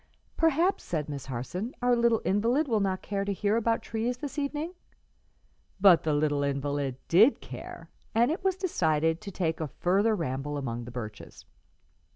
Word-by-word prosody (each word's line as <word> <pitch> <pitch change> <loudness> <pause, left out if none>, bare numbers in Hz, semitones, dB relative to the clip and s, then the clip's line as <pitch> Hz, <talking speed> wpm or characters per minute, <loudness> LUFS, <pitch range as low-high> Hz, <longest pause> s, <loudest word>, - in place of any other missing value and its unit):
"Perhaps," 325 +4 +2
said 155 -4 -3
Miss 140 -3 -6
Harson, 180 - -4
"our 245 0 +3
little 235 -1 +2
invalid 235 +10 +2
will 225 -4 +2
not 190 -2 -1
care 200 -1 -2
to 200 - -2
hear 205 +2 0
about 230 0 +1
trees 230 +2 -2
this 290 +2 -5
evening?" 295 +4 -3 1.1
But 190 -4 +7
the 155 - 0
little 145 -1 +1
invalid 140 -1 -1
did 215 +11 +5
care, - - -9 0.3
and 240 +5 +4
it 350 +4 -3
was 380 -1 +2
decided 160 - +1
to 210 - -7
take 170 -4 -2
a 160 - -2
further 200 +9 +1
ramble 145 -3 -3
among 120 -4 -4
the 120 - -8
birches. 110 -4 -8
195 Hz, 170 wpm, -28 LUFS, 145-240 Hz, 1.1 s, But